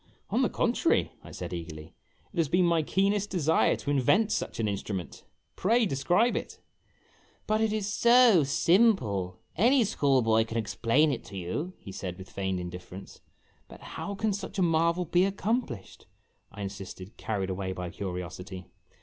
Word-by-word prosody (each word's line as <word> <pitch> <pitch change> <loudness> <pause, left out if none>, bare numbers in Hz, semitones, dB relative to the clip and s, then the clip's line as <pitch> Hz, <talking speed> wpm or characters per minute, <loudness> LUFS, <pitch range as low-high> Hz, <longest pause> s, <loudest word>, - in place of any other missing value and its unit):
" - - -41
On - - +2
the - - +2
contrary," - - +1
I - - -11
said, - - -6
eagerly, 80 -2 -7 0.2
" - - -36
it - - -11
has 165 -4 +2
been 180 +3 +3
my 170 -1 +3
keenest 195 +5 +1
desire 160 -4 +2
to 145 - -4
invent 185 - +3
such - - -2
an 110 - +1
instrument. 100 -3 -4 0.3
Pray 230 +4 +2
describe 180 - +2
it! - - -5 0.4
" - - -34
"But 215 +1 +1
it 220 -1 +2
is 215 -2 -1
so 235 -8 +6
simple; 135 - +2 0.2
any 245 - +4
school 140 - +2
boy 110 0 +3
can 115 0 -5
explain 115 +7 +2
it 125 - -4
to 100 - -9
you," 145 - -4
he 100 - -10
said, 90 -2 -6
with 95 0 -11
feigned 95 -1 -2
indifference. 90 +2 -9 0.5
"But - - -14
how 200 - -5
can 215 0 0
such 195 +1 -6
a 190 - +3
marvel 170 +1 +2
be 175 +2 +3
accomplished?" 200 - -2 0.4
I 100 0 -7
insisted, 95 +1 -8
car 105 -3 -2
ried 95 0 -2
away 95 0 -3
by 90 -2 -5
curiosity. 90 0 -6
140 Hz, 175 wpm, -28 LUFS, -, 0.5 s, so